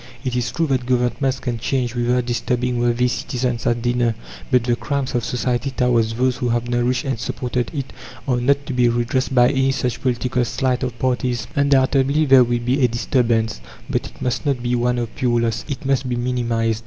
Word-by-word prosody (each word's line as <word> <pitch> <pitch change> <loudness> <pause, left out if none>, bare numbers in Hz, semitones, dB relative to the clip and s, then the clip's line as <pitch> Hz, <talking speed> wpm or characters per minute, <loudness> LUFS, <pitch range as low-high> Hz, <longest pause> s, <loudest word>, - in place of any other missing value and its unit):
It 125 -1 -1
is 125 -1 -1
true 165 - 0
that 130 -4 -1
Governments 130 +2 0
can 120 -3 -3
change 125 0 -1
without 120 0 +1
disturbing 120 +1 -1
worthy 120 +1 +2
citizens 125 -1 -2
at 120 -1 0
dinner, 120 -2 +1 0.3
but 125 -2 +3
the 120 0 +1
crimes 140 +2 -3
of 120 -2 0
society 125 +2 -1
towards 120 -4 +1
those 125 +1 +1
who 125 - -1
have 120 0 0
nourished 120 +1 0
and 130 -4 -2
supported 125 +1 -2
it 140 -4 -5 0.3
are 125 -2 +2
not 140 +2 +2
to 135 - -4
be 125 -1 +3
redressed 125 +3 0
by 125 0 +6
any 135 -1 +2
such 125 -3 -2
political 125 0 0
sleight 130 +1 -1
of 125 -2 -3
parties. 125 -2 -1
Undoubtedly 140 +1 +3
there 135 -2 +7
will 120 0 0
be 125 +3 0
a - - +6
disturbance, 115 - 0 0.3
but - - -1
it - - -15
must 125 - -1
not 135 -5 -1
be 120 0 0
one 125 0 +1
of 120 -2 -3
pure 125 -4 +1
loss; 115 -1 -1
it 140 -1 -5
must 135 -1 0
be 120 - 0
minimized. 120 -2 0
125 Hz, 205 wpm, -21 LUFS, 120-130 Hz, 0.3 s, there